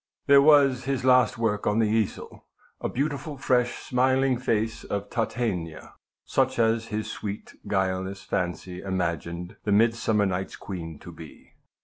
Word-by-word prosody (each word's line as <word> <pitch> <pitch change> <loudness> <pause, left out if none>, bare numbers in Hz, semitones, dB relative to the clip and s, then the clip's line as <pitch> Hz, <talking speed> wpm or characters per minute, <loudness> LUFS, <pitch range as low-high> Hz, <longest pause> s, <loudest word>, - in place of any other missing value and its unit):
There 140 -1 +7
was 140 -4 +5
his 135 -2 -1
last 125 -2 +4
work 110 -3 -1
on 105 - +2
the 115 - +4
easel 110 -1 -2 0.3
a - - -2
beautiful, 145 +2 -3
fresh, 125 -2 +1
smiling 130 0 +2
shape 115 -2 +1 0.2
of 100 0 -3
Titania, 100 -9 -3 0.3
such 130 -1 +1
as 115 -1 +2
his 110 -1 -3
sweet, 105 0 -6
guileless 95 0 -1
fancy 90 -1 -3
imagined 90 0 -3
the 105 - -1
Midsummer 110 0 +3
Night's 95 0 -2
queen 80 -5 -7
to 85 - -10
be. 80 -2 -13
110 Hz, 140 wpm, -26 LUFS, 95-125 Hz, 0.3 s, There